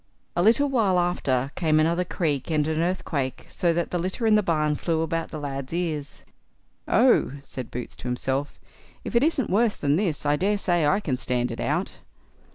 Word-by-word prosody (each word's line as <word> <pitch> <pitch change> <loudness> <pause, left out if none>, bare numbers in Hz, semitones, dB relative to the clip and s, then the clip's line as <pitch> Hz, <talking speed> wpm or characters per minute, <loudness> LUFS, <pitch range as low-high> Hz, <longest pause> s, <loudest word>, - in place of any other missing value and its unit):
A 175 - +2
little 230 +9 +4
while 220 -9 +2
after 140 -7 0
came 155 -3 +2
another 170 +3 +2
creak 160 -6 -2
and 155 -2 +1
an 160 0 -1
earthquake, 155 -7 -2
so 175 -3 +1
that 170 +1 -1
the 175 - 0
litter 185 +7 -2
in 220 - +4
the 210 - +5
barn 155 -5 +1
flew 160 +1 -1
about 165 0 -2
the - - -6
lad's 140 -1 -5
ears. 160 -5 -3 0.6
"Oh!" - - +4
said 130 -3 -7
Boots 125 0 -6
to - - -7
himself, 130 +3 -2 0.4
"if - - -5
it 235 - +5
isn't 280 - +1
worse 220 +2 +3
than 145 +1 +1
this, 175 -7 -1
I 145 0 +2
daresay 185 -4 +1
I 200 +7 +2
can 130 -9 -2
stand 125 -2 0
it - - -6
out." - - -2
165 Hz, 190 wpm, -25 LUFS, 145-185 Hz, 0.6 s, the